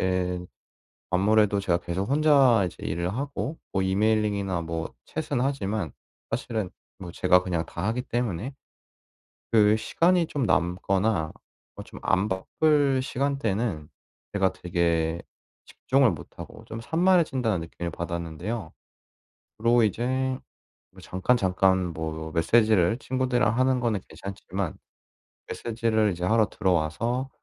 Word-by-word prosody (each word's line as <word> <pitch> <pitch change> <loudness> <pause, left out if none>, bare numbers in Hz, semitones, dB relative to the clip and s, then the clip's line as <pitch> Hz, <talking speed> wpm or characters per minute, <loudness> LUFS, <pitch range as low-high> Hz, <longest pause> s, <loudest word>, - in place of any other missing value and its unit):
예. 90 -1 0 0.7
아무래도 100 +2 +3
제가 85 -3 +1
계속 90 +4 -3
혼자 140 -8 +5
이제 90 - -7
일을 85 +4 -2
하고 140 +3 -3
뭐 95 - +1
emailing이나 100 -2 +1
뭐 80 0 -4
chat은 150 -5 -3
하지만 105 - -1 0.4
사실은 110 -6 -2 0.3
뭐 90 -3 -8
제가 90 +2 +4
그냥 85 -3 -1
다 - - -5
하기 120 +3 -1
때문에 120 0 -3 1.0
그 110 -1 +5
시간이 170 +7 +2
좀 145 - -2
남거나 95 -1 +1 0.4
어 - - -8
좀 - - -12
안 95 +2 +2
바쁠 140 +8 +2
시간대는 115 - -1 0.4
제가 95 -2 +2
되게 85 -2 0 0.5
집중을 130 -3 +2
못하고 75 -4 -10
좀 110 - -7
'산만해진다.'는 155 - +2
느낌을 85 +1 -5
받았는데요. 85 +4 -4 0.8
그리고 115 +1 +4
이제 110 +3 0 0.9
뭐 - - -15
잠깐, 95 +7 +1
잠깐 95 -3 +2
뭐 80 0 -5
메시지를 110 +3 +3
친구들이랑 125 -3 0
하는 130 -1 +3
거는 115 -4 0
괜찮지만 95 +1 -5 0.7
메시지를 110 -2 0
이제 90 0 -4
하러 110 +2 +3
들어와서 100 +8 0
100 Hz, 290 characters per minute, -26 LUFS, 90-120 Hz, 1.0 s, 혼자